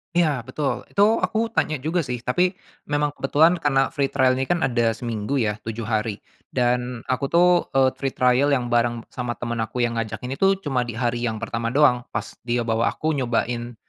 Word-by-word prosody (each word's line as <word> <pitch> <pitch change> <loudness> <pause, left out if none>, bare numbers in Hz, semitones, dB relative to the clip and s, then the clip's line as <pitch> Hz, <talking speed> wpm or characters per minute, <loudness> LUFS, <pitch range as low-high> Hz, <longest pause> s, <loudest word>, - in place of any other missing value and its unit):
Iya, 155 -7 +2
betul. 140 +2 -3
Itu 210 +3 +3
aku 225 0 0
tanya 155 - 0
juga 160 +4 0
sih 125 -6 -3
tapi 180 +8 +1 0.3
memang 145 0 0
kebetulan 155 +5 +3
karena 135 -3 +2
free 140 -1 0
trial 130 -1 +2
ini 130 - -1
kan 175 -1 +1
ada 120 -4 +1
seminggu 115 +2 -3
ya, 110 -5 0
7 115 +1 -5
hari 110 -1 -2 0.2
dan 125 -1 -1
aku 135 +2 0
tuh, 170 +4 +4 0.3
eee, 130 -1 +4
free 135 -1 -2
trial 125 +2 +3
yang 120 -2 -3
bareng 120 -1 +1
sama 125 -2 -4
temen 115 +1 -4
aku 110 +3 -1
yang 115 -1 0
ngajak 110 0 -4
ini 130 +2 -5
tuh 195 0 +4
cuma 125 -4 -1
di 115 - -6
hari 120 0 -1
yang 110 -1 -4
pertama 115 0 -2
doang. 125 -5 +4
Pas - - -3 0.2
dia 120 0 +1
bawa 115 0 +1
aku 155 - -1
nyobain, 120 -3 -1
125 Hz, 200 wpm, -23 LUFS, 120-145 Hz, 0.3 s, tuh